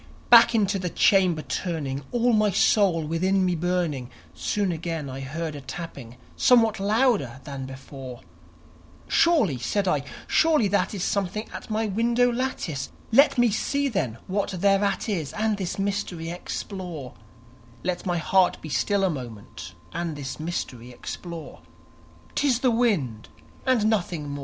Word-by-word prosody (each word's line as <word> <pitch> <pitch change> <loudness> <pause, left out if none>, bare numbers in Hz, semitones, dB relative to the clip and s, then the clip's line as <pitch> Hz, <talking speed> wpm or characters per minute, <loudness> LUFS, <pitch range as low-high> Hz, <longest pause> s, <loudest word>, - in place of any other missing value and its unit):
_ - - -29
Back 235 0 +8
into 200 -2 +2
the 180 -1 -2
chamber 180 -4 +3
turning, 145 -6 -3
all 240 0 +2
my 215 -1 +4
soul 190 -3 +3
within 185 +4 +1
me 180 - +1
burning, 165 -7 -1 0.2
Soon 200 -3 -1
again 165 -2 -3
I 130 - -6
heard 155 +4 -4
a 145 - -7
tapping, 135 -4 -8 0.2
somewhat 225 -4 +4
louder 205 - +1
than 135 0 -6
before, 130 -1 -9 0.9
"Surely," 280 - +3
said 195 - -1
I, 150 -6 +2 0.2
"surely 310 -9 +3
that 205 +1 +1
is 185 - -3
something 200 +2 -1
at - - -8
my 220 +1 0
window 235 +4 +2
lattice; 210 - -3 0.2
Let 275 +4 +5
me 240 -2 +4
see, 280 +6 0
then, 150 - -2
what 200 +2 -1
thereat 195 +2 +1
is, 170 -10 -2
and 215 -1 0
this 190 -3 -3
mystery 195 -4 -2
explore 175 -5 -6 0.7
Let 180 -1 -2
my 175 -2 0
heart 185 +2 +3
be 155 - -8
still 195 +10 +1
a 190 - +3
moment, 105 - -8 0.2
and 170 -2 -3
this 140 0 -6
mystery 130 -7 -4
explore; 165 +6 -8 0.7
'Tis 260 -4 +1
the 255 - +3
wind 185 - 0 0.4
and 250 -5 +3
nothing 175 -8 -1
more." 145 0 -5
180 Hz, 150 wpm, -25 LUFS, 145-215 Hz, 0.9 s, Back